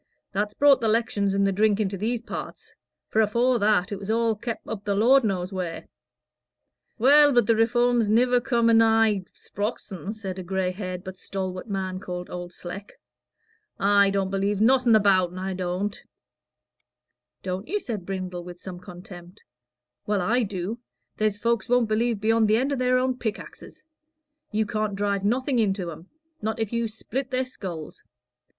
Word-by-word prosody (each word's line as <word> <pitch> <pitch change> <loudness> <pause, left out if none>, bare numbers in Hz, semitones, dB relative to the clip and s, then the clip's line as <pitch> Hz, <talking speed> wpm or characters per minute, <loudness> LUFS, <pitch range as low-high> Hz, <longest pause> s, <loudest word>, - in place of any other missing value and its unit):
"That's 205 +1 -2
brought 280 -2 +5
the 225 - +1
'lections 215 -3 +1
and 200 0 +2
the 195 - +2
drink 210 +1 +2
into 200 -2 -1
these 225 +4 -2
parts; - - -7 0.3
for 220 - +2
afore 235 +4 +2
that, 205 -2 +2
it 200 - -4
was 200 +1 -8
all 225 0 +2
kep' 235 +2 -6
up 210 -3 -5
the 200 -1 -1
Lord 250 +6 +5
knows 190 -3 -2
wheer." 180 -3 -4 1.1
"Well, 290 +4 +6
but 240 -4 +4
the 230 - +3
Reform's 240 0 +2
niver 245 +3 +3
come 235 -2 +1
anigh 225 -3 +4
Sprox'on," 205 -2 -5
said 195 -4 -6
a - - -5
gray 190 0 -1
haired 185 -1 -6
but 190 -1 -9
stalwart 185 -1 -5
man 190 -2 -3
called 180 -2 -6
Old 175 0 -6
Sleck. 185 +3 -8 0.9
"I 200 0 +4
don't 195 -1 -1
believe 195 +1 0
nothing 245 +1 +4
about'n, 185 -4 +3
I 190 +1 -3
don't." 185 +2 -3 1.4
"Don't 185 +2 -4
you?" 415 +6 -1
said 220 - -5
Brindle, 185 -1 -5
with 175 0 -10
some 180 -1 -8
contempt. 180 0 -12 0.6
"Well, 205 -2 +1
I 240 +7 +2
do. 205 +1 -3 0.4
There's 215 -2 +1
folks 235 +2 -1
won't 245 -2 +3
believe 225 0 0
beyond 225 +1 +3
the 215 +1 +4
end 270 +4 0
o' - - +1
their 255 -1 +2
own 255 0 0
pickaxes. 220 -3 -7 0.7
You 215 0 +1
can't 215 -1 -2
drive 200 -1 -1
nothing 250 +4 +1
into 195 -5 0
'em, 165 +4 -12 0.3
not 220 +1 -2
if 225 0 -2
you 235 0 0
split 245 +4 -5
their 255 0 0
skulls. 180 -11 -8
210 Hz, 170 wpm, -25 LUFS, 190-230 Hz, 1.4 s, Well